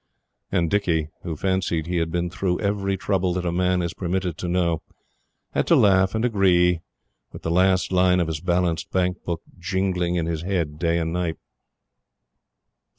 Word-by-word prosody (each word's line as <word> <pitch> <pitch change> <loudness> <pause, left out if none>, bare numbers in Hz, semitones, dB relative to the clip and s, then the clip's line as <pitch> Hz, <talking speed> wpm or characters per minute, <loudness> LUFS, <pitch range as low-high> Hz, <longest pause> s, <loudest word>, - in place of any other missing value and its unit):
And 85 -3 +2
Dicky, 85 -7 +1
who 85 -3 -4
fancied 90 -2 0
he 90 +1 -2
had 80 -1 0
been 85 0 -1
through 90 -1 -1
every 100 -1 -1
trouble 95 -2 0
that 90 -1 -2
a 85 - 0
man 90 0 +1
is 85 -1 -3
permitted 90 -1 -2
to 90 - -3
know, 85 -2 +1 0.7
had - - 0
to - - +6
laugh 95 0 +4
and 110 +2 +1
agree; 90 -6 +3 0.5
with - - -11
the 80 - -1
last 95 +2 +3
line 90 0 +4
of 85 - +2
his 80 -1 -4
balanced 90 -2 0
Bank 90 0 0
book 85 -2 -4 0.2
jingling 90 -1 0
in 85 -2 0
his 80 -2 -2
head 85 -5 -2
day 85 -1 +1
and 80 -1 -1
night. 85 -2 -1
90 Hz, 175 wpm, -23 LUFS, 85-95 Hz, 0.7 s, to